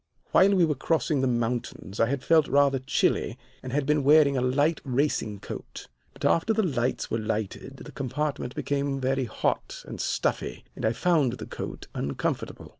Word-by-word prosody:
"While 200 +1 +5
we 180 -3 +5
were 155 - +1
crossing 150 0 0
the 130 - +2
mountains 120 -4 -2
I 115 - +4
had 135 +1 -2
felt 160 -2 +4
rather 140 -1 +3
chilly 130 -3 0 0.2
and 130 - -6
had 145 +1 0
been 150 0 +2
wearing 145 0 +6
a 130 - +1
light 145 +6 +1
racing 125 -6 -1
coat. - - -8 0.3
But - - -6
after 190 +7 +3
the 220 0 +1
lamps 130 -7 -1
were 115 - 0
lighted 110 +4 -4
the - - -10
compartment 140 -1 -3
became 140 -1 -1
very 135 0 0
hot 105 - -2
and - - -5
stuffy, - - -2
and - - -4
I 110 - +2
found 150 -4 +2
the 125 - -7
coat - - -7
uncomfortable. 70 0 -3
135 Hz, 180 wpm, -27 LUFS, 125-150 Hz, 0.3 s, wearing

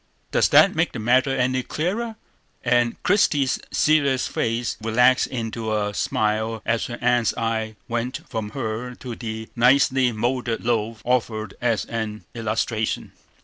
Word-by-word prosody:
Does - - +3
that - - +6
make - - 0
the - - -5
matter 125 +5 +3
any 130 -1 +1
clearer?" 210 - -2 0.5
And 120 -1 +2
Christie's 145 -9 +2
serious 140 -4 +2
face 115 +1 -1
relaxed 125 +4 +3
into 115 -2 -4
a 105 -1 -1
smile 110 +1 -1
as 115 0 0
her 120 - -6
aunt's 120 -1 +2
eye 110 -2 -2
went 120 +2 -3
from 110 -2 -4
her 120 +1 -3
to 125 -1 -7
the 110 -1 -6
nicely 130 +1 +4
moulded 120 +1 -2
loaf 115 -2 -1
offered 110 -4 0
as 115 -4 +1
an 110 -2 -4
illustration. 110 -1 -2
120 Hz, 140 wpm, -23 LUFS, 110-130 Hz, 0.5 s, that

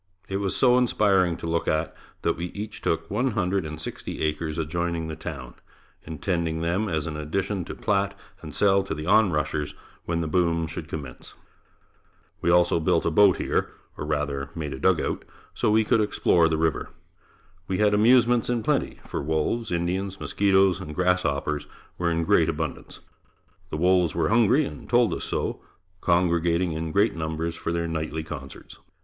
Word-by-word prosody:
It 95 - -2
was 100 -1 -1
so 125 -1 +5
inspiring 95 -8 +2
to - - -7
look 85 0 -1
at, 80 +1 0 0.3
that - - +1
we 85 - -4
each 105 +1 -6
took 80 0 -1
one 125 +4 0
hundred 95 -4 0
and 75 0 -7
sixty - - -6
acres 75 0 -2
adjoining 85 +1 -2
the 80 - -4
town, 70 -6 -7 0.5
intending 80 0 -2
them 90 +6 0
as 80 -2 -1
an 80 -2 -4
addition 95 +5 -2
to - - -7
plat 100 -1 0 0.2
and - - -8
sell 100 -1 +3
to 95 -4 -4
the 75 0 -6
on 100 +2 +4
rushers 75 -1 -2 0.3
when 85 0 -1
the 80 - -2
boom 85 0 +1
should 80 0 -6
commence. 70 -5 -8 1.1
We 85 - +1
also 85 -1 +4
built 80 +1 +1
a 85 - +2
boat 100 +2 +5
here, - - 0 0.3
or - - -6
rather 70 -2 -2
made 75 -3 -4
a - - -7
dugout, - - +1 0.3
so - - 0
we 110 +1 +4
could 110 +1 +2
explore 90 -5 +3
the 80 - 0
river. 80 -2 0 0.8
We 95 - -1
had 105 0 +3
amusements 120 +2 +4
in 120 -2 0
plenty, - - -1
for - - -3
wolves, 80 +10 -1
Indians, 90 +3 -2
mosquitoes 95 -2 +3
and 75 0 -7
grasshoppers 75 -5 0 0.3
were 85 -1 +1
in 85 0 0
great 80 0 +3
abundance. 80 -1 -5 0.7
The - - -4
wolves 90 -1 +3
were 85 - +1
hungry 120 +6 +4
and - - -9
told 120 -1 +3
us - - -4
so, - - -2 0.4
congregating 85 0 +2
in 80 0 -3
great 100 +4 +2
numbers 80 +1 -3
for 85 - -3
their 85 0 -1
nightly 80 -1 -3
concerts. 70 -3 -9
85 Hz, 175 wpm, -25 LUFS, 80-100 Hz, 1.1 s, so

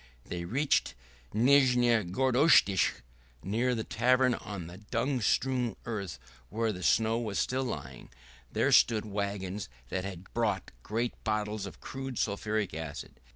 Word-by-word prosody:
They 85 -1 -5
reached 135 +10 +1 0.4
Nizhneye 120 -4 +4
Gorodistche. 130 - +4 0.4
Near 120 +6 0
the 110 - -2
tavern 125 +3 +3
on 100 -6 -6
the 90 +3 -10
dung 120 +5 -1
strewn 125 +2 +1
earth, 100 -6 -4 0.3
where 115 0 0
the 90 -3 -7
snow 110 +4 +3
was 110 -4 -3
still 130 +1 0
lying, 65 - -6 0.4
there - - +1
stood 110 -2 +5
wagons 100 -2 -3 0.2
that 95 - -2
had 95 -1 -8
brought 105 -5 -1
great 115 - -3
bottles 105 -2 -1
of - - -12
crude 135 -2 -6
sulphuric 105 -1 -1
acid. 80 -2 -7
110 Hz, 135 wpm, -30 LUFS, 100-125 Hz, 0.4 s, stood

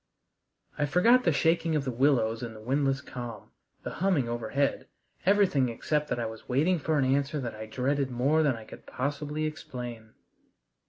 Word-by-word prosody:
I 145 - +2
forgot 230 - +4
the 170 - +5
shaking 165 +1 +2
of 145 -2 0
the 130 - -1
willows 115 -3 +2
in 115 -2 -6
the - - -10
windless 135 +4 0
calm, 120 -4 -8 0.3
the - - -4
humming 180 -10 +2
overhead, 120 +4 -1 0.4
everything 190 -11 +4
except 150 +6 -1
that - - -2
I 115 - -1
was 110 0 -8
waiting 160 +8 +2
for 155 +1 0
an 135 - +3
answer 140 +3 +1
that 120 -4 -4
I 110 0 -7
dreaded 135 +4 0
more 135 +6 +2
than 140 -5 +2
I 110 -1 -10
can - - -11
possibly 145 +3 -2
explain. 120 -7 -7
135 Hz, 175 wpm, -28 LUFS, 120-150 Hz, 0.4 s, the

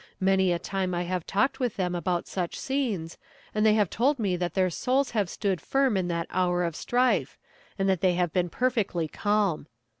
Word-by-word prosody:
Many 190 -1 +3
a 175 - +1
time 185 0 -2
I 175 - -1
have 180 -1 -3
talked 265 +7 +1
with 245 -4 -1
them 180 -2 -1
about 175 0 -1
such 180 -3 -3
scenes, 230 -12 -2 0.3
and 215 - +1
they 215 -1 +5
have 210 -3 +3
told 275 +6 +2
me 200 -6 0
that 175 -2 -3
their 185 -1 +2
souls 260 - 0
have 205 -6 0
stood 190 -5 -1
firm 270 - +1
in 185 -2 0
that 170 -1 -1
hour 180 -1 +1
of 170 -2 -2
strife, 250 +6 +1 0.4
and 195 -1 0
that 190 -3 +1
they 185 -2 +3
have 175 -2 0
been 180 -1 +1
perfectly 215 -8 0
calm. 205 -4 0
190 Hz, 205 wpm, -27 LUFS, 175-220 Hz, 0.4 s, they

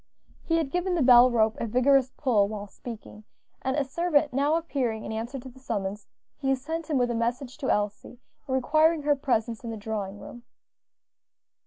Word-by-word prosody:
He 330 - 0
had 310 -4 -1
given 360 +1 0
the 325 - +2
bell 250 0 +8
rope 220 -2 +2
a 230 - -2
vigorous 260 +3 +3
pull 225 -8 +2
while 205 -1 -6
speaking, 215 0 -10 0.4
and 265 +2 -1
a 290 - +2
servant 295 0 +1
now 285 +4 +2
appearing 265 -9 -2
in - - -5
answer 230 +5 -4
to 260 0 -9
the 260 +1 -13
summons, 205 -4 -4 0.3
he 270 -2 +1
sent 320 +4 -5
him 295 - +1
with 245 -1 +1
a - - -1
message 240 +3 -2
to 265 - -2
Elsie, 210 +3 -2 0.3
requiring 310 +4 +2
her 290 0 +3
presence 235 -5 -1
in 230 - -5
the 225 - -5
drawing 205 -2 -4
room. 240 - -10
255 Hz, 185 wpm, -27 LUFS, 225-285 Hz, 0.4 s, bell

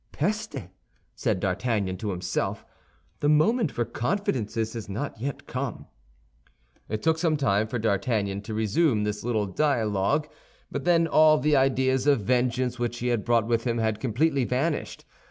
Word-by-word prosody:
"Peste!" 210 +2 -2 0.6
said - - -1
D'Artagnan 100 0 -1
to 105 +3 -4
himself, 90 -1 -2 0.5
"the 145 - +1
moment 175 - +3
for 120 - -1
confidences 120 - -2
has 115 -3 -6
not 110 +3 -5
yet 140 +2 -4
come." 130 -1 -4 1.0
It 110 0 -3
took 160 0 +2
some 160 -2 +2
time 110 -6 +1
for 120 - -3
D'Artagnan 100 -2 0
to 110 +1 -6
resume 110 +2 +2
this 105 0 -3
little 110 -3 0
dialogue; 115 +3 +1 0.4
but 140 - -4
then 170 -1 +4
all 155 -1 +5
the 150 0 +2
ideas 130 0 +2
of 140 -6 +4
vengeance 125 +2 0
which 120 0 -2
he 125 +1 -2
had 120 -4 0
brought 115 -2 +2
with 115 0 0
him 120 -1 0
had 110 -2 0
completely 135 +4 +1
vanished. 135 +6 -2
120 Hz, 155 wpm, -26 LUFS, 110-145 Hz, 1.0 s, all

